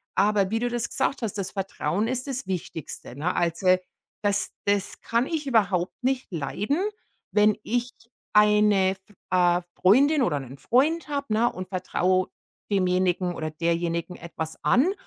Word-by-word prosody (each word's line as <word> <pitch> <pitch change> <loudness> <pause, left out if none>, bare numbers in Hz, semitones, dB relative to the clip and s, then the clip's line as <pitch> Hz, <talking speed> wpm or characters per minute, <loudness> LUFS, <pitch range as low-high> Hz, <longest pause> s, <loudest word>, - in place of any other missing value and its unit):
Aber 200 0 +3
wie 225 - +1
du 245 0 0
das 240 -1 -2
gesagt 270 0 -1
hast, 210 -2 -3
das 195 -1 -3
Vertrauen 195 0 -2
ist 255 +2 -2
das 265 -1 -3
Wichtigste, 160 -8 -5
ne? 170 +5 -1
Also, 180 +2 +3 0.5
das 205 0 0
das 200 -1 0
kann 235 +2 +1
ich 300 -3 -3
überhaupt 195 -7 +1
nicht 260 -4 -1
leiden, 195 - -1 0.5
wenn 210 0 +4
ich 245 +1 -1 0.4
eine, 210 -2 +4 0.4
äh, 175 -1 +3
Freundin 275 +10 +4
oder 150 -11 +1
'nen 135 +1 -9
Freund 305 - +2
habe 240 -5 0
und 185 0 -5
vertraue 185 0 +1 0.4
demjenigen 180 -1 +1
oder 155 -1 -3
derjenigen 170 +2 -1
etwas 160 -1 -6
an 315 +11 +4
200 Hz, 145 wpm, -25 LUFS, 180-240 Hz, 0.5 s, wenn